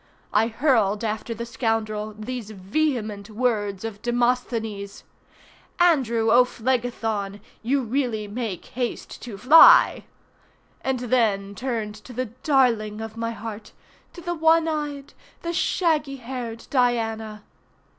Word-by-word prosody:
I 220 +2 +4
hurled 230 -4 +1
after 220 +1 -3
the 235 +2 -5
scoundrel 215 -3 -2
these 225 0 -5
vehement 215 0 -2
words 215 -3 -1
of 215 -2 -6
Demosthenes— 235 -4 -1 0.8
Andrew 240 -10 +3
O'Phlegethon, 230 -4 +1 0.2
you 265 +4 +1
really 235 -3 -1
make 210 -4 -4
haste 245 0 -5
to 230 -5 -7
fly, 320 - +7 0.8
and 260 -2 -1
then 220 -5 +1
turned 225 -2 -3
to 215 +4 -12
the 255 +2 -2 0.2
darling 230 -7 +2
of 225 0 -6
my 230 0 -2
heart, 220 -1 -7 0.4
to 350 - -10
the 345 +1 -2
one 325 0 +3
eyed! 295 -3 -4 0.3
the 340 0 -2
shaggy 310 -5 +1
haired 245 -3 -6
Diana. 225 -4 0
230 Hz, 115 wpm, -24 LUFS, 215-255 Hz, 0.8 s, fly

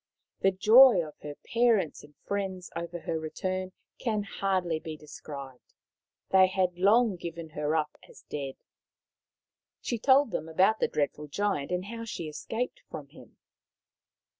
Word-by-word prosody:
The 195 - +4
joy 215 0 +7
of 150 - -10
her 145 -1 -7 0.2
parents 230 -8 +2
and 150 0 -16
friends 190 -2 -3
over 170 0 -5
her 160 - -2
return 185 +4 -3 0.3
can 215 -4 -1
hardly 185 -5 -1
be 160 -1 -7
described. 140 -3 -10 0.6
They 190 -1 +7
had 185 -2 0
long 210 +1 +4
given 170 -1 -7
her 150 0 -1
up 155 -2 -1
as - - -16
dead. 135 -2 -5 1.2
She 235 - -3
told 265 +1 +4
them 160 - -3
about 190 +7 +3
the - - +2
dreadful 150 0 -2
Giant 150 -3 -1
and 180 +1 -2
how 230 +2 -6
she 170 -7 -5
escaped 230 - -4
from - - -8
him. - - -16
185 Hz, 145 wpm, -29 LUFS, 155-205 Hz, 1.2 s, joy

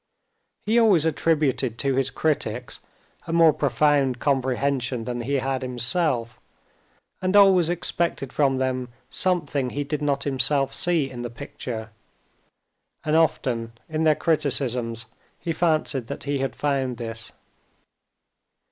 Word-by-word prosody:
He 225 +3 +3
always 200 -9 +4
attributed 150 -7 +1
to 135 +1 0
his 135 0 +1
critics 135 -7 -2 0.5
a - - -3
more 165 -2 +6
profound 145 -4 +2
comprehension 130 -2 0
than 120 0 -4
he 140 +4 -1
had 135 0 -1
himself, 125 -1 -1 0.8
and 185 +1 0
always 190 -4 +6
expected 170 -5 -1
from 135 -3 +2
them 130 -1 -1 0.2
something 165 -8 0
he 145 +3 -3
did 150 +1 -3
not 140 -2 0
himself 135 0 +1
see 165 -1 +1
in 125 -2 -8
the 120 - -4
picture. 115 -1 -7 1.1
And 155 0 +1
often 120 -7 +1
in 160 0 -1
their 155 -1 +4
criticisms 125 -8 0 0.3
he 170 - -3
fancied 155 -7 0
that - - -6
he 140 -1 -1
had 135 -2 -2
found 135 -4 -1
this. 115 -3 -6
135 Hz, 130 wpm, -24 LUFS, 125-155 Hz, 1.1 s, more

